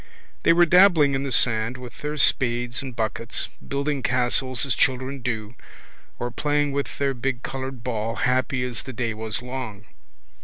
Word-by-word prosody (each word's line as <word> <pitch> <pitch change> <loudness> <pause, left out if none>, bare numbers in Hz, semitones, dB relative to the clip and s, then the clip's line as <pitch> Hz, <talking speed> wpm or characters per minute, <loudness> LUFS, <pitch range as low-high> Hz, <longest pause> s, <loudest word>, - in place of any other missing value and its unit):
They - - +4
were 175 +1 +6
dabbling 170 -5 +5
in 135 - 0
the 140 -1 -3
sand 115 0 +3
with 125 -2 -11
their 150 +1 -3
spades 120 -2 +2
and 130 -3 -7
buckets, 115 +1 -2 0.2
building 140 0 -1
castles 125 0 +1
as 135 - +1
children 130 +1 0
do, 110 -2 -3 0.6
or 120 0 -3
playing 145 +2 0
with 140 0 -3
their 140 -1 0
big 125 0 -3
coloured 135 -2 -5
ball, 115 -2 -2
happy 130 0 0
as 125 -2 -3
the 130 - -8
day 115 -2 -2
was 110 +2 -4
long. 125 -5 -6
130 Hz, 165 wpm, -24 LUFS, 120-140 Hz, 0.6 s, were